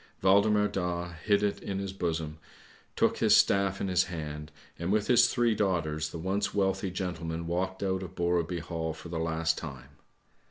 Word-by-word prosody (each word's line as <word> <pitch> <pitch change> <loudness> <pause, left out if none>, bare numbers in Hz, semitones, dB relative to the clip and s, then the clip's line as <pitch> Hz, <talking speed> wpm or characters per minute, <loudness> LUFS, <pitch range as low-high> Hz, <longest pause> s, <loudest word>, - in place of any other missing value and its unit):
Waldemar 105 +2 +4
Daa 90 -2 -3
hid 105 -1 +3
it 105 - 0
in 100 - -4
his 95 -1 -4
bosom, 80 -4 -3 0.6
took - - +2
his - - +6
staff 100 0 +3
in - - -1
his 90 -1 +3
hand, 75 -3 -6 0.3
and 85 +3 -1
with 105 0 +2
his 120 -1 +6
three 120 -1 +2
daughters 80 -7 0
the 85 - -7
once 95 +6 -1
wealthy 95 0 +1
gentleman 85 -3 -4
walked 95 +3 -2
out 95 -1 0
of 95 -1 -8
Borreby 85 -1 0
Hall 80 -1 -3
for 80 +2 -10
the 85 -1 -3
last 80 0 0
time. 65 -5 -8
90 Hz, 175 wpm, -29 LUFS, 80-100 Hz, 0.6 s, his